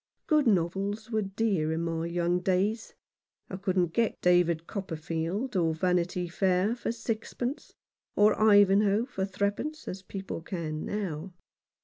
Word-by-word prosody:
Good 300 -4 +3
novels 200 +3 0
were 220 -1 +1
dear 195 -5 0
in 165 +1 -1
my 165 0 -2
young 175 +1 0
days. 195 +5 0 0.6
I 185 - -4
couldn't 185 -3 0
get 230 -2 +1
"David 175 -2 +3
Copperfield" 175 - -3
or 165 -3 +2
"Vanity 180 +1 0
Fair" 185 +4 +1
for 240 - -3
six 230 -1 -4
pence, 250 +4 -4 0.4
or 210 +1 +5
"Ivanhoe" 205 +1 +5
for 195 -7 -3
threepence, 205 +11 -3
as 185 - -5
people 190 -2 -6
can 160 -4 -4
now. 185 -4 -4
190 Hz, 135 wpm, -29 LUFS, 170-210 Hz, 0.6 s, or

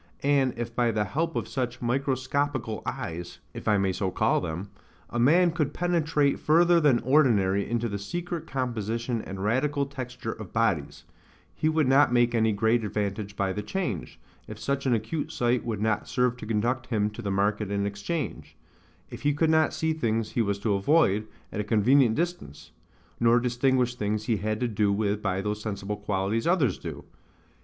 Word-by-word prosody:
And 135 -3 +2
if 115 0 -5
by 120 -1 +2
the 110 -2 +1
help 160 - -2
of - - -2
such 125 -2 -3
MICROSCOPICAL 130 -1 -1
EYES 85 -9 -5 0.2
(if - - -8
I 105 -1 +4
may 95 -1 +1
so 95 +1 -1
call - - +1
them) 90 +6 -5 0.4
a 120 - -2
man 170 +8 +5
could 150 -4 -2
penetrate 155 -5 +1
further 170 +2 +4
than 145 -6 +4
ordinary 110 -8 +3
into 120 0 0
the 100 -2 -4
secret 170 - -5
composition 115 -2 -2
and 95 -1 -6
radical 140 +6 +1
texture 130 -4 -6
of 110 -5 -9
bodies, 105 -11 0 0.5
he 155 - 0
would 155 -3 +2
not 135 0 +5
make 120 -1 +3
any 110 -1 +3
great 110 +3 +2
advantage 105 0 -3
by 95 -1 0
the 105 - -3
change, 110 - -4 0.3
if 110 - -8
such 140 +5 -2
an 125 - +4
acute 145 +8 -3
sight 125 -5 +1
would 110 -3 -3
not 110 -1 0
serve 125 -1 +1
to 110 - -8
conduct 120 +4 0
him 105 -3 0
to 105 - -8
the 100 - -3
market 100 +1 0
and 100 0 -1
exchange; 100 +10 -4 0.6
if - - -8
he 145 -1 +1
could 160 +1 +2
not 160 0 +3
see 160 0 -1
things 115 -7 -1
he 120 - +1
was 100 -2 0
to 100 +1 0
avoid, 105 -1 +2 0.2
at 105 - -2
a - - -3
convenient 115 +3 +4
distance; 175 - -4 0.5
nor 120 +1 +5
distinguish 125 0 +1
things 105 -2 -2
he 115 -1 0
had 110 +2 -2
to 125 - 0
do 105 -2 +1
with 105 0 0
by 95 -2 -1
those 105 +1 -3
sensible 105 -1 -4
qualities 105 +3 -1
others 155 - +2
do. - - -7
115 Hz, 185 wpm, -27 LUFS, 105-140 Hz, 0.6 s, man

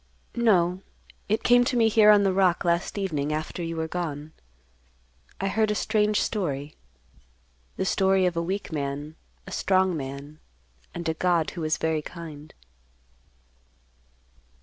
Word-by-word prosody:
"No. 190 -6 +2 0.5
It 215 - +1
came 245 0 +5
to 245 - 0
me 225 -1 +4
here 215 -1 +5
on 205 -1 +7
the 195 -1 +2
rock 185 -3 +2
last 170 +3 0
evening 155 -7 -2
after 155 +3 -4
you 165 0 -4
were 160 0 -2
gone. 155 -3 -5 1.1
I 195 - -1
heard 215 +2 +1
a 210 - 0
strange 210 0 +1
story; 150 -8 -3 1.0
the - - -1
story 190 -1 +2
of 180 -1 0
a 170 - 0
weak 190 +3 -4
man, 145 +1 -4 0.3
a - - -10
strong 185 -2 +2
man, 140 +1 -7 0.6
and 170 -1 -4
a 160 - +1
God 170 -1 +1
who 175 - -7
was 155 0 0
very 160 -1 0
kind." 155 -2 -10
175 Hz, 150 wpm, -26 LUFS, 155-195 Hz, 1.1 s, on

